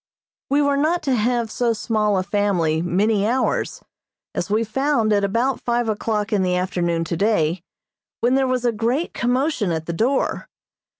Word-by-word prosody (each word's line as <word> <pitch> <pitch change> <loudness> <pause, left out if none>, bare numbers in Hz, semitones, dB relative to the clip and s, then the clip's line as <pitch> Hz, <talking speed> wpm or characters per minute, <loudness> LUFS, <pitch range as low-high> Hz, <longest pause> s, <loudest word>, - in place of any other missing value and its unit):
We 285 +2 +3
were 285 0 +2
not 320 +5 +1
to 275 -3 +1
have 235 -1 0
so 235 0 +1
small 210 -2 0
a 185 - 0
family 185 -6 0
many 200 +4 +1
hours, 255 +3 -1 0.5
as - - -3
we 215 +2 +2
found 230 -1 +1
at 200 -1 +2
about 235 +6 0
five 240 -1 0
o'clock 215 0 -1
in 200 - +2
the 180 -1 +1
afternoon 175 -2 -1
today, 170 -1 0 0.6
when 240 +2 +2
there 265 0 +2
was 255 -1 -1
a 240 - +3
great 235 +9 -1
commotion 250 - 0
at 160 -1 -2
the 170 - -3
door. 250 +10 0
220 Hz, 170 wpm, -21 LUFS, 195-250 Hz, 0.6 s, We